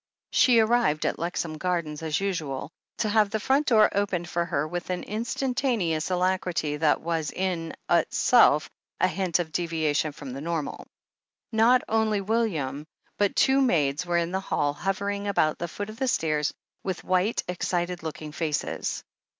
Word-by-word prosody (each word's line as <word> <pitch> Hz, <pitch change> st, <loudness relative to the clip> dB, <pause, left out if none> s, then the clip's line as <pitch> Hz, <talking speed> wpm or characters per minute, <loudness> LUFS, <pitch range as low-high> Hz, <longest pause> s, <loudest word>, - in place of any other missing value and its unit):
She 250 Hz, -3 st, +5 dB
arrived 220 Hz, -9 st, +3 dB
at -, -, -1 dB
Lexham 165 Hz, -2 st, -3 dB
Gardens 170 Hz, -4 st, -2 dB
as 155 Hz, -1 st, -1 dB
usual, 160 Hz, -8 st, -3 dB, 0.3 s
to 215 Hz, -, 0 dB
have 210 Hz, -1 st, +3 dB
the 220 Hz, -, -1 dB
front 275 Hz, +7 st, +1 dB
door 215 Hz, -4 st, +6 dB
opened 190 Hz, -4 st, -1 dB
for 170 Hz, 0 st, -1 dB
her 150 Hz, -2 st, -1 dB
with 175 Hz, +2 st, -5 dB
an 180 Hz, -1 st, -2 dB
instantaneous 230 Hz, -, -1 dB
alacrity 180 Hz, -4 st, 0 dB
that 150 Hz, -1 st, +2 dB
was 165 Hz, -2 st, -1 dB
in 175 Hz, -3 st, -3 dB
itself 170 Hz, -, +4 dB, 0.3 s
a -, -, +4 dB
hint 185 Hz, -1 st, 0 dB
of 170 Hz, -3 st, -3 dB
deviation 160 Hz, -3 st, 0 dB
from 140 Hz, -2 st, -8 dB
the 135 Hz, -, -6 dB
normal. 165 Hz, -2 st, -4 dB, 0.6 s
Not 230 Hz, +3 st, +4 dB
only 220 Hz, -2 st, +1 dB
William, 170 Hz, -, -1 dB, 0.3 s
but 205 Hz, -1 st, +2 dB
two 270 Hz, 0 st, +4 dB
maids 150 Hz, -, +2 dB
were 175 Hz, -1 st, 0 dB
in 170 Hz, 0 st, 0 dB
the 190 Hz, -, 0 dB
hall, 145 Hz, -6 st, 0 dB
hovering 200 Hz, +4 st, -2 dB
about 155 Hz, -6 st, +1 dB
the 170 Hz, -, -2 dB
foot 205 Hz, +5 st, -6 dB
of 220 Hz, -, -13 dB
the 265 Hz, -, 0 dB
stairs 155 Hz, -, +1 dB, 0.3 s
with 190 Hz, -2 st, -3 dB
white, 185 Hz, +4 st, +1 dB
excited 175 Hz, 0 st, -2 dB
looking 155 Hz, -1 st, -6 dB
faces. 150 Hz, -2 st, -2 dB
175 Hz, 160 wpm, -26 LUFS, 155-205 Hz, 0.6 s, door